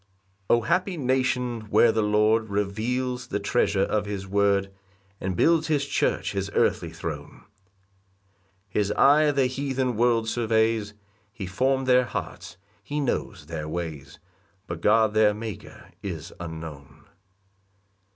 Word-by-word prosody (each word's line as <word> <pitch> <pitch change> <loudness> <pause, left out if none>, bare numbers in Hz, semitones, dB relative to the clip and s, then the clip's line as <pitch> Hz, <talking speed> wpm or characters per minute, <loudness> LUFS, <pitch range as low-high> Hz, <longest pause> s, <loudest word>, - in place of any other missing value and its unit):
1 120 - +5
O - - -1
Happy 180 - 0
nation, 125 -3 0
where 115 - +5
the 110 0 0
Lord 105 +1 +2
Reveals 120 +5 -2
the 105 - -2
treasure 100 -2 +1
of 105 0 -1
his 100 -2 -4
word, 100 0 +1 0.5
And 95 -1 -3
builds 160 - +3
his 145 -3 +1
church - - 0
his 100 0 -3
earthly - - +1
throne! - - -7 1.2
His 100 +1 0
eye 150 +5 +5
the 140 -2 +2
heathen 130 -1 -1
world 115 0 +2
surveys, 110 -2 +1 0.4
He 105 -3 -6
form'd 130 +8 0
their 125 0 +4
hearts, 85 -6 -6 0.3
he 145 +1 -3
knows 110 - -2
their 75 -1 -5
ways; 80 -4 -5 0.5
But 85 -2 -6
God 110 +1 +4
their 110 -1 +4
Maker 110 -1 -8
is 85 -5 -6
unknown. 80 -5 -8
110 Hz, 130 wpm, -25 LUFS, 100-125 Hz, 1.2 s, 1